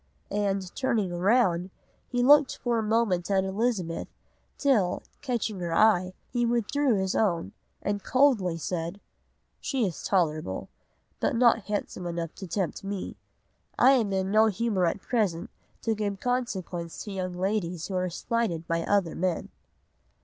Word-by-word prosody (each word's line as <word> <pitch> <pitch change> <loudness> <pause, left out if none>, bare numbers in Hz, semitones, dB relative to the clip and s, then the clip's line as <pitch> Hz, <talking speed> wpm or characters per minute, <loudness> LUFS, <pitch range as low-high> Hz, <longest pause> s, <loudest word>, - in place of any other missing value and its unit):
and, 195 -2 -1
turning 220 -9 0
round, 185 -1 +2 0.4
he 245 -1 +1
looked 290 +1 +6
for 240 -2 0
a - - +1
moment 210 -5 +1
at 195 -1 +3
Elizabeth, 190 -4 -1 0.5
till, 220 -11 +2 0.2
catching 235 -7 -2
her 170 -2 -2
eye, 185 -4 +4 0.2
he 240 -1 0
withdrew 240 +3 +1
his 190 -1 0
own, 175 -6 +1 0.3
and 205 -1 -1
coldly 240 -11 +3
said,—'She 180 - -5
is 180 -5 -4
tolerable; 155 - 0 0.5
but - - +1
not 230 -3 +4
handsome 205 -3 -3
enough 170 -1 -4
to 190 - -8
tempt 185 +2 -2
me; 195 -1 -4 0.6
and 255 - +6
I - - +8
am 230 -7 +2
in 190 0 0
no 215 +1 +5
humour 210 -3 +1
at 175 +4 -2
present 205 -9 -1 0.3
to 225 - +1
give 205 -2 -2
consequence 190 -9 -3
to 210 - -7
young 185 -2 -3
ladies 180 -3 -1
who 195 - -6
are 185 0 0
slighted 175 -3 -2
by 165 0 0
other 190 -2 +1
men. 180 0 -1
195 Hz, 150 wpm, -27 LUFS, 180-230 Hz, 0.6 s, I